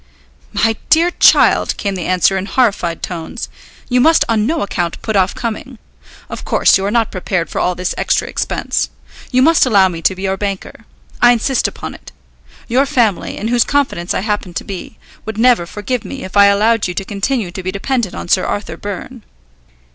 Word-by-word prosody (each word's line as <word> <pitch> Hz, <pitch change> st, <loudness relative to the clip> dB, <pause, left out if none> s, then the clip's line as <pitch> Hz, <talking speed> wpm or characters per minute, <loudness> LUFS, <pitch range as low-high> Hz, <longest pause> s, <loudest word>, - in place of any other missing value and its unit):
"My 225 Hz, -1 st, +1 dB
dear 335 Hz, +2 st, +4 dB
child," -, -, +4 dB
came 200 Hz, -3 st, -2 dB
the 180 Hz, -3 st, -4 dB
answer 185 Hz, +1 st, +2 dB
in 190 Hz, +1 st, -3 dB
horrified 200 Hz, -10 st, 0 dB
tones, 175 Hz, +7 st, -5 dB, 0.4 s
"you 250 Hz, 0 st, +2 dB
must 320 Hz, +4 st, +4 dB
on 220 Hz, -1 st, +1 dB
no 325 Hz, +3 st, 0 dB
account 175 Hz, -4 st, -3 dB
put 220 Hz, -, -2 dB
off 190 Hz, -1 st, +2 dB
coming. 235 Hz, +2 st, -5 dB, 0.5 s
Of -, -, -7 dB
course -, -, +3 dB
you 195 Hz, -, +1 dB
are -, -, 0 dB
not 230 Hz, 0 st, +1 dB
prepared 185 Hz, -2 st, -2 dB
for -, -, -2 dB
all 180 Hz, -, 0 dB
this 180 Hz, 0 st, -2 dB
extra -, -, +1 dB
expense. -, -, -2 dB, 0.4 s
You 255 Hz, 0 st, +3 dB
must 325 Hz, +3 st, +5 dB
allow 200 Hz, -7 st, +4 dB
me 165 Hz, -2 st, -6 dB
to 190 Hz, -, +2 dB
be 190 Hz, -, -8 dB
your 190 Hz, 0 st, -1 dB
banker. 195 Hz, -1 st, -5 dB, 0.4 s
I 240 Hz, 0 st, +7 dB
insist 245 Hz, +3 st, 0 dB
upon -, -, -7 dB
it. -, -, -13 dB, 0.6 s
Your 260 Hz, +4 st, +2 dB
family, 235 Hz, -, 0 dB
in 220 Hz, -, -3 dB
whose 240 Hz, -1 st, +3 dB
confidence 260 Hz, -12 st, -1 dB
I -, -, 0 dB
happen 205 Hz, -4 st, -3 dB
to -, -, -3 dB
be, 195 Hz, -2 st, -8 dB, 0.3 s
would 220 Hz, -1 st, -6 dB
never 235 Hz, -7 st, +3 dB
forgive 215 Hz, +5 st, -3 dB
me 270 Hz, -1 st, -7 dB
if 190 Hz, -, -8 dB
I 200 Hz, 0 st, +7 dB
allowed 215 Hz, +2 st, +2 dB
you 180 Hz, -, -5 dB
to 195 Hz, -, -3 dB
continue 205 Hz, 0 st, -2 dB
to 190 Hz, -, -6 dB
be 185 Hz, +1 st, -3 dB
dependent 220 Hz, +1 st, -2 dB
on -, -, -6 dB
Sir 185 Hz, +1 st, +2 dB
Arthur 170 Hz, -6 st, -4 dB
Byrne." 205 Hz, +6 st, -7 dB
205 Hz, 200 wpm, -16 LUFS, 185-245 Hz, 0.6 s, I